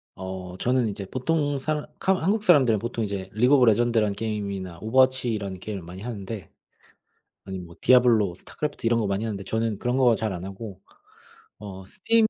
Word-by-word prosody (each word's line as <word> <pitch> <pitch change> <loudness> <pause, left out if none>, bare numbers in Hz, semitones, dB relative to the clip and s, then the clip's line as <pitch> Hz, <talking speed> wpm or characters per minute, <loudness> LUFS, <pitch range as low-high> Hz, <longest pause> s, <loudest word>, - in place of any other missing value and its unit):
어, 95 -1 -7
저는 125 +1 +1
이제 100 -1 -5
보통 145 +5 0
사람 150 +2 -2
카마 190 0 +1
한국 205 +4 +1
사람들은 135 - +5
보통 115 +1 -3
이제 95 -2 -4
리그 125 +6 +3
오브 125 - +6
레전드란 115 -2 +3
게임이나 100 -4 -4
오버워치라는 115 -5 +1
게임을 100 0 -5
많이 90 +3 -9
하는데 105 -5 -6 1.0
아님 95 -2 -6
뭐 85 - -14
디아블로, 115 -7 +5
스타크래프트 145 +4 -5
이런 115 0 +3
거 110 - 0
많이 100 +2 -1
하는데 105 -3 -3
저는 110 0 -1
그런 125 +3 -1
거 125 -3 +5
잘 110 -2 -2
안 90 0 -6
하고 95 0 -8 0.8
어, 95 -2 -8
스팀 225 - +2
110 Hz, 390 characters per minute, -25 LUFS, 95-125 Hz, 1.0 s, 오브